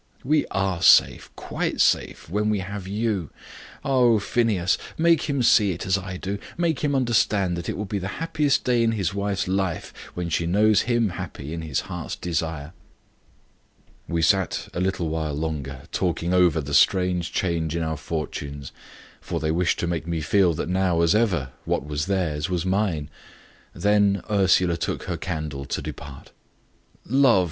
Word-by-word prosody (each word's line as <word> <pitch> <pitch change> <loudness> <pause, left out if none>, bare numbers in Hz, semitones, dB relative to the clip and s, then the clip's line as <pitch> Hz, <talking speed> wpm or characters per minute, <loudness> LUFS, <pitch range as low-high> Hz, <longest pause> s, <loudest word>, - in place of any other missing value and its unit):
"We 150 +3 +2
are 95 -3 -1
safe - - +5
quite - - -3
safe - - +1
when 105 +5 0
we 105 - +1
have 95 0 -6
you. 105 -4 -1 0.6
Oh, 125 -4 +4
Phineas! 100 -3 +1 0.2
make 165 -2 +3
him 140 -3 +1
see 105 -4 +4
it 85 - -6
as 95 - +2
I 95 -2 -4
do. 100 +2 -4 0.2
Make 170 -4 0
him 145 -2 0
understand 110 -7 +2
that 85 -1 -5
it - - -3
will 105 - -3
be 100 +1 -3
the 95 - -4
happiest 150 -3 +1
day 125 -2 +2
in 115 -1 +2
his 100 -4 -1
wife's 100 -2 -1
life 95 -2 -2 0.2
when 90 -1 -3
she 85 +1 0
knows 105 +5 +3
him 120 -3 +2
happy 85 -5 -7
in 85 - -4
his 75 -4 -2
heart's - - -6
desire." 80 -2 -3 1.3
We 85 -1 -1
sat 95 -2 +1
a - - -3
little 95 -3 -1
while 80 -2 -2
longer, 70 -3 -4
talking 90 -1 -1
over 90 -4 +4
the 70 0 -6
strange 90 +2 +3
change 85 -3 -1
in 85 - -1
our 80 0 -2
fortunes 70 -2 -5 0.5
for - - -4
they 80 0 -1
wished 85 -1 +1
to - - 0
make 85 -2 -3
me 85 -1 -1
feel 85 +2 +2
that - - -3
now, 90 -2 +1
as 85 +2 +4
ever, 95 - +1
what - - -1
was 75 +2 -3
theirs 90 -5 -1
was 90 -1 -1
mine; 95 -6 0 0.7
then 100 -2 +2
Ursula 95 -3 +3
took 85 - -3
her - - -3
candle 75 -3 -4
to - - -3
depart. 70 -2 -9 0.7
"Love!" - - -15
90 Hz, 170 wpm, -24 LUFS, 80-105 Hz, 1.3 s, safe